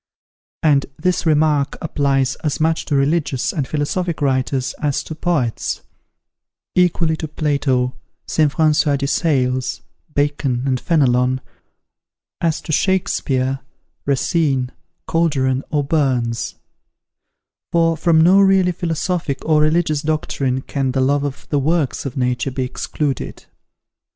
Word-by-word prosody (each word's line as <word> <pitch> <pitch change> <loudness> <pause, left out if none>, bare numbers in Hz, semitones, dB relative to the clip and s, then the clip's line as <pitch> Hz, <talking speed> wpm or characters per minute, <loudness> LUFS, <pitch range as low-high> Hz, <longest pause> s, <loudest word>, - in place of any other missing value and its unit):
And 145 -3 +3
this 180 -2 0
remark 150 -2 +2
applies 135 -3 +1
as 150 -3 -2
much 160 +1 +1
to 145 - -1
religious 140 -2 +1
and 140 -4 -2
philosophic 160 +3 -2
writers 130 -1 0
as 145 -2 0
to - - -7
poets, 155 -8 -1 0.9
equally 175 -2 +2
to 155 - -4
Plato, 140 -4 0 0.3
St. 155 -2 +2
François 155 -2 +2
de 140 - -2
Sales, 130 -4 0 0.3
Bacon, 145 -4 0
and 130 -2 +1
Fenelon, 130 -5 +2 1.0
as 165 -2 0
to - - -6
Shakespeare, 135 -7 +1 0.5
Racine, 135 -2 +1 0.4
Calderon, 135 -5 +1
or 145 -1 +1
Burns; 130 -6 0 1.2
for 165 -1 +3
from 160 0 +3
no 185 +4 +6
really 190 -2 +4
philosophic 165 -3 -2
or 155 -1 +3
religious 155 -1 +2
doctrine 140 -4 -1
can 135 -2 -2
the 135 - +1
love 140 +2 +2
of 145 -1 -5
the 145 - +1
works 150 -1 0
of 135 - -7
Nature 125 +1 0
be 130 0 -2
excluded. 135 +1 -3
145 Hz, 120 wpm, -19 LUFS, 130-160 Hz, 1.2 s, no